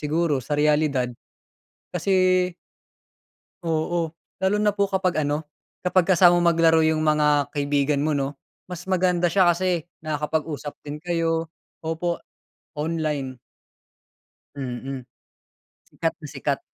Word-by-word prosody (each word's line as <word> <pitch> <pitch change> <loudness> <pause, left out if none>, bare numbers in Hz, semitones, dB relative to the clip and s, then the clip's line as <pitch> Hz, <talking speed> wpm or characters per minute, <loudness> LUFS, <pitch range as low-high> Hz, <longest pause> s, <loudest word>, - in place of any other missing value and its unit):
siguro, 150 -1 +1
sa 145 +4 -2
realidad. 150 -4 +2 0.8
Kasi 185 0 +3 1.2
Oo, 165 0 0 0.3
lalo 190 +2 +3
na 210 -1 +3
po 200 - +3
kapag 185 -4 +1
ano, 150 +2 -1 0.3
kapag 180 0 +3
kasama 175 -1 +6
mo 175 0 +4
maglaro 165 -1 +4
'yung 155 0 +2
mga 150 -2 +3
kaibigan 145 0 +1
mo, 155 - +1
'no. 140 0 -1 0.3
Mas 180 -1 -7
maganda 180 -2 +2
siya 190 -1 +5
kasi 175 -1 +1 0.2
nakakapag-usap 150 -1 -2
din 150 0 -6
kayo. 165 -1 0 0.3
Opo, 165 +2 -2 0.6
online. 150 -4 -2 1.2
Mm, 135 0 -5 0.9
sikat - - -1
na - - -7
sikat. - - -2
160 Hz, 115 wpm, -24 LUFS, 150-175 Hz, 1.2 s, kasama